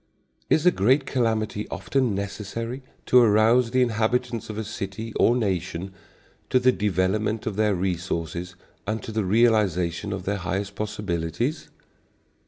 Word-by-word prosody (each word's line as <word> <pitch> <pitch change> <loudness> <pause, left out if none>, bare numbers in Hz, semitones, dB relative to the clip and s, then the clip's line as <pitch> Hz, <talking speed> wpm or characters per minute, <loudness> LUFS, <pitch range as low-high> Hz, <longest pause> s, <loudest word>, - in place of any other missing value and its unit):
Is 160 - +3
a 180 - +7
great 130 - +3
calamity 110 -4 -1
often 100 +4 0
necessary 105 +5 -4 0.2
to 125 - +6
arouse 115 +2 +4
the 130 +1 +3
inhabitants 120 +1 -1
of 105 - -5
a 110 - -2
city 105 +1 -6
or 120 - +3
nation 95 -4 -2 0.6
to 130 - +4
the 130 0 +4
development 105 +2 0
of 110 - -2
their 105 -1 +2
resources 90 -1 -3 0.3
and 110 0 -2
to - - -6
the 110 -1 -1
realisation 100 -3 +2
of 95 -2 -4
their 100 +1 -1
highest 95 +1 -3
possibilities? 105 - -3
105 Hz, 140 wpm, -25 LUFS, 95-115 Hz, 0.6 s, a